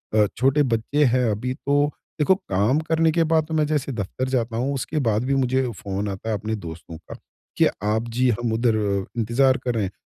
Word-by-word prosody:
अ, 105 -1 +5
छोटे 135 +4 +3
बच्चे 140 +7 0
हैं 125 +1 +2
अभी, 125 +5 -2
तो 145 +1 +1 0.3
देखो 170 +6 +4
काम 120 - 0
करने 160 0 +2
के 165 +1 +2
बाद 160 -1 +2
तो 160 - -5
मैं 155 -1 +2
जैसे 150 -3 -1
दफ़्तर 115 +3 -3
जाता 120 -3 -1
हूँ, 135 +4 -1
उसके 150 +3 -2
बाद 110 +2 +1
भी 135 +1 +1
मुझे 130 -1 +1
फ़ोन 100 0 -4
आता 100 +3 -5
है, 110 - +1
अपने 110 +2 -3
दोस्तों 85 -3 -9
का, 80 - -11 0.4
कि - - +5 0.2
आप 110 +2 0
जी, 125 +2 +1
हम 120 -1 -1
उधर 115 0 +2 0.4
इंतजार 130 +4 +3
कर 125 - -1
रहे 110 - 0
हैं, 95 - -3
125 Hz, 215 wpm, -23 LUFS, 110-140 Hz, 0.4 s, अ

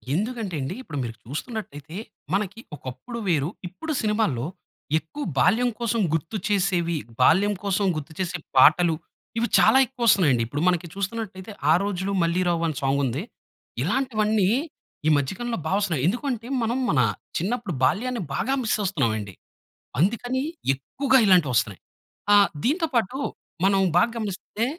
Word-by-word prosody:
ఎందుకంటే 215 0 -2
ఎండి 135 - -3
ఇప్పుడు 160 - -7
మీరు 115 -1 -5
చూస్తున్నట్టయితే 150 - -6 0.4
మనకి 200 +2 -1 0.2
ఒకప్పుడు 130 - -7
వేరు, 155 -4 +2 0.2
ఇప్పుడు 315 - -6
సినిమాల్లో, 210 - 0 0.5
ఎక్కువ 285 - -7 0.2
బాల్యం 225 - +4
కోసం 235 -1 0
గుర్తు 165 +6 -1
చేసేవి, 180 -4 +1 0.3
బాల్యం 195 +10 +5
కోసం 200 0 +1
గుర్తు 155 0 -6
చేసే 180 -1 -1 0.2
పాటలు, 170 +1 +6 0.4
ఇవి 235 +1 +1
చాలా - - +6
ఎక్కువస్తున్నాయండి. 210 - +3
ఇప్పుడు 145 +5 -3
మనకి 175 -1 +1
చూస్తున్నట్టయితే 200 0 -4 0.2
'ఆ - - +8
రోజులు 200 -1 -2
మళ్ళీ 170 +2 +1
రావు' 170 -1 +1
అని 155 - -3
సాంగ్ 135 +1 +1
ఉంది. 130 +6 -2 0.6
ఇలాంటివన్నీ 215 - +1 0.6
ఈ - - +5
మధ్య 140 +6 -1
కాలంలో 240 -3 -3
బా - - -2
వస్తున్నాయి. 170 -10 0
ఎందుకంటే 240 +2 -2 0.2
మనం 235 +3 0
మన 150 - +3 0.4
చిన్నప్పుడు 205 +1 -2
బాల్యాన్ని 240 - +1
బాగా 265 - 0
మిస్ 225 - +1
అస్తున్నామండి. 110 - -1 0.7
అందుకని 245 - +1 0.3
ఎక్కువగా 265 - +2
ఇలాంటివస్తున్నాయి. 130 - +3 0.5
ఆహ్, 200 -1 +7 0.2
దీనితో 325 +6 +2
పాటు 235 +2 +1 0.5
మనం 195 0 +4 0.2
బాగా 230 +7 +4
గమనిస్తే 210 +1 -3
195 Hz, 135 wpm, -25 LUFS, 160-230 Hz, 0.7 s, ఆ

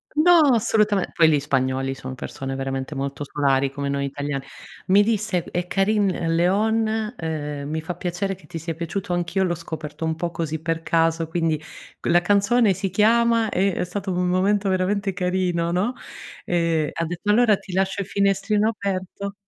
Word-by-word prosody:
No, 345 +2 +6
assolutame 215 -3 +2
poi 165 -1 +5
li 150 -2 +3
spagnoli, 135 -1 0
son 130 -1 -7
persone 135 +1 -5
veramente 135 +1 -4
molto 140 +1 -3
solari, 140 -1 +1
come 140 0 -4
noi 140 0 -1
italiani. 140 0 -4 0.4
Mi 200 +2 +6
disse: 210 -5 0
"È 175 0 -4
Carin 200 +1 +2 0.3
Leon, 220 +5 +1
uhm, 150 -3 -4
mi 160 0 -2
fa 175 +2 -4
piacere 180 +3 -2
che 180 -4 -14
ti 165 - -6
sia 165 +1 -4
piaciuto, 170 +4 -4
anch'io 175 +2 0
l'ho 175 -2 +1
scoperto 160 -2 -6
un 160 0 0
po' 170 +1 -3
così 160 -2 -3
per 165 0 -2
caso, 165 0 +1
quindi 165 -2 0 0.4
q - - -14
la 175 +1 +4
canzone 205 +3 +3
si 195 +2 -3
chiama" 230 +3 +3
e 195 0 +1
è - - -1
stato 190 +2 -4
un 180 0 0
momento 195 +2 +2
veramente 195 +1 0
carino, 180 -2 0
no 200 +8 0 0.5
e 165 -3 +1
ha 165 - -2
detto: 175 +5 -4
"Allora 220 -1 +5
ti 185 - -11
lascio 190 +1 0
il 195 - -5
finestrino 200 +2 +1
aperto." 200 -1 -4
180 Hz, 175 wpm, -23 LUFS, 160-200 Hz, 0.5 s, No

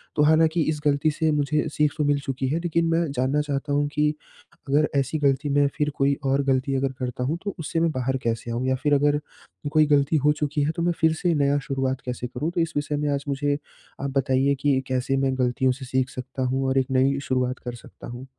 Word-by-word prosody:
तो 150 - +3
हालाँकि, 160 +2 +4
इस 155 0 0
गलती 145 +2 +3
से 160 +1 0
मुझे 150 +1 0
सीख 150 -1 +2
तो 155 - +1
मिल 145 0 +2
चुकी 135 -1 -3
है, 155 +4 0
लेकिन 170 -1 0
मैं 165 +1 +2
जानना 135 +2 +1
चाहता 145 0 -2
हूँ 145 0 +2
कि 150 0 +2 0.6
अगर 150 +2 +3
ऐसी 140 +3 -1
गलती 140 0 +1
में 145 0 +3
फिर 150 0 +1
कोई 140 0 +2
और 135 +1 +2
गलती 135 0 +1
अगर 135 0 0
करता 125 -1 -3
हूँ, 150 +6 -1
तो 200 -2 -4
उससे 160 +1 -2
मैं 165 0 +2
बाहर 130 -1 -1
कैसे 115 0 -2
आऊँ? 120 +2 -2
या 130 - +2
फिर 150 -1 +3
अगर 145 +1 +3 0.5
कोई 155 -1 +5
गलती 145 +1 +3
हो 150 - +6
चुकी 150 0 0
है, 150 - +1
तो - - -1
मैं 175 0 +2
फिर 160 -1 +4
से 170 +2 0
नया 140 -1 +2
शुरुआत 135 -1 -1
कैसे 125 0 -4
करूँ? 135 +7 -3
तो 175 -1 0
इस 165 0 -1
विषय 145 0 -1
में 150 0 -1
आज 140 0 -2
मुझे 145 +1 0 0.4
आप 140 - -2
बताइए 135 +1 +2
कि 140 -2 +3
कैसे 130 +1 0
मैं 135 -1 0
गलतियों 125 +1 +2
से 130 - -7
सीख 130 0 0
सकता 130 +1 -5
हूँ? 130 +1 0
और 130 - +1
एक 130 - -1
नई 135 +1 +2
शुरुआत 130 0 0
कर 120 -1 -4
सकता 120 - -13
हूँ? 120 +2 -8
140 Hz, 240 wpm, -24 LUFS, 130-150 Hz, 0.6 s, हो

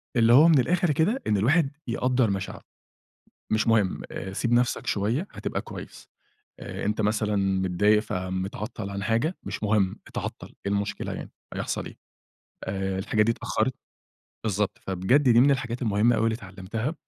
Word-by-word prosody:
اللي 115 0 +5
هو 150 +6 +8
من 160 -5 +6
الآخر 175 +4 +2
كده 190 - +1
إن 105 - +3
الواحد 140 - +3 0.2
يقدَّر 125 -1 +1
مشاعره، 95 0 -4 0.9
مش 110 +1 +2
مهم 110 -4 +2 0.3
سيب 120 +4 -1
نَفْسك 120 +1 +2
شوية 115 - 0
هتبقى - - -3
كويس، - - -10 0.5
آآ، 95 0 -6
أنت 105 +1 0
مثلًا 105 0 +1
متضايق 95 +2 +2
فمتعطل 95 +2 -4
عن 100 0 -4
حاجة، 120 - 0
مش - - -5
مهم 105 -3 +2
إتعطل، - - -6
إيه 100 - 0
المشكلة 100 0 -2
يعني - - -7 0.2
هيحصل - - -3
إيه، - - -10 0.7
آآ، 95 0 -2
الحاجة 105 +2 +1
دي 115 - +3
اتأخّرِت"، - - -1 0.7
بالضبط. 105 -1 -1
فبجد 95 +10 +2
دي 120 -3 +5
من 140 - +6
الحاجات 130 -2 -1
المهمة 110 +2 +3
أوي 110 - +1
اللي 115 -1 +2
اتعلمتها 105 - -5
110 Hz, 155 wpm, -26 LUFS, 100-125 Hz, 0.9 s, هو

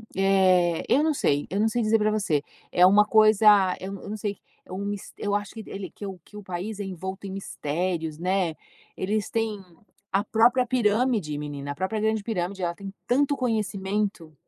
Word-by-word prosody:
eh, 185 -3 +3
eu 280 +4 +4
não 315 -1 +2
sei, 145 - 0
eu 195 - -2
não 220 - +3
sei 240 +1 -1
dizer 220 +1 +3
pra 215 0 +2
você 195 -9 +1 0.3
é 180 - +5
uma 205 +2 +6
coisa, 215 -1 +4 0.4
eu 190 +1 -5
eu - - -8
não 215 - -4
sei, 205 -1 -3 0.3
é - - -16
um 195 +2 -4
mis 205 -1 -5
eu 205 0 -1
acho 205 0 -3
que 220 - -7
ele 195 -2 -6
que 205 - -9
o 190 -2 -7
que 210 - -13
o 210 - -9
país 190 +3 -5
é 205 - -3
envolto 190 +2 -6
em - - -6
mistérios, 165 -3 -3
né. 180 -2 0 0.4
Eles 205 +2 -1
têm 225 -2 -1 0.5
a 195 +1 +2
própria 240 +4 +3
pirâmide, 225 - +1
menina, 145 -1 -5
a - - -6
própria 190 +7 -2
grande 220 -1 0
pirâmide 190 -3 -3
ela 170 - 0
tem 195 0 -8 0.2
tanto 280 +3 +2
conhecimento 205 -6 -2
200 Hz, 200 wpm, -25 LUFS, 185-215 Hz, 0.5 s, uma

